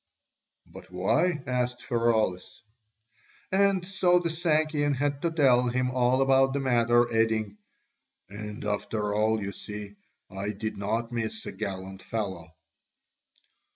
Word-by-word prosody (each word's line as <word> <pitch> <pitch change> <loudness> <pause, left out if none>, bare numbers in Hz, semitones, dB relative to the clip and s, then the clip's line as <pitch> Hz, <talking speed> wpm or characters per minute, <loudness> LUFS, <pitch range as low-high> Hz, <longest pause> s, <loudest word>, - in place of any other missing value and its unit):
"But - - -13
why?" 150 - +1
asked 125 -1 -2
Pheraulas. 115 -6 0 0.9
And 195 -1 +2
so 180 -2 +3
the 170 -2 0
Sakian 155 -3 +1
had 140 +1 -1
to 170 - +1
tell 130 -6 +3
him 125 +1 0
all 125 +1 +3
about 135 0 +4
the 140 - 0
matter, 120 -2 +3
adding, 110 -2 0 0.7
"And 105 +1 -7
after 105 0 -2
all, 110 +1 +2
you 100 -1 -4
see, 105 0 -8 0.3
I 100 +2 -3
did 110 +2 -4
not 110 +4 -2
miss 110 -2 -3
a - - -5
gallant 95 -1 -6
fellow." 95 -7 -4
120 Hz, 125 wpm, -27 LUFS, 105-135 Hz, 0.9 s, about